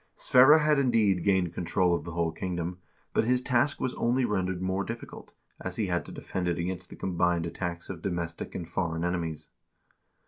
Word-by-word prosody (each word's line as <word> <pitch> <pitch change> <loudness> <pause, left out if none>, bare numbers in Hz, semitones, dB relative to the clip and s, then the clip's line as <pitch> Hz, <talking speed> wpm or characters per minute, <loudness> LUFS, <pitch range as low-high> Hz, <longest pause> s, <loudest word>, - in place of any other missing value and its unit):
Sverre 135 +5 +7
had 150 -2 +3
indeed 110 -9 +3
gained 95 -4 +2
control 90 +1 +1
of 85 - -1
the 85 - -6
whole 85 -1 0
kingdom, 90 0 -4 0.3
but - - +3
his 125 +2 +2
task 130 +3 +1
was 130 - -1
only 125 +2 +1
rendered 95 -4 -1
more 95 +1 -1
difficult, 115 +2 -8 0.3
as 95 -1 -5
he 110 - 0
had 90 -2 -1
to - - -8
defend 90 -2 -4
it 85 -1 0
against 90 +1 -4
the - - -10
combined 90 -2 0
attacks 85 0 -4
of 90 -4 -7
domestic 85 -3 -4
and 85 - -4
foreign 85 -2 -2
enemies. 80 -3 -3
90 Hz, 185 wpm, -28 LUFS, 85-110 Hz, 0.3 s, Sverre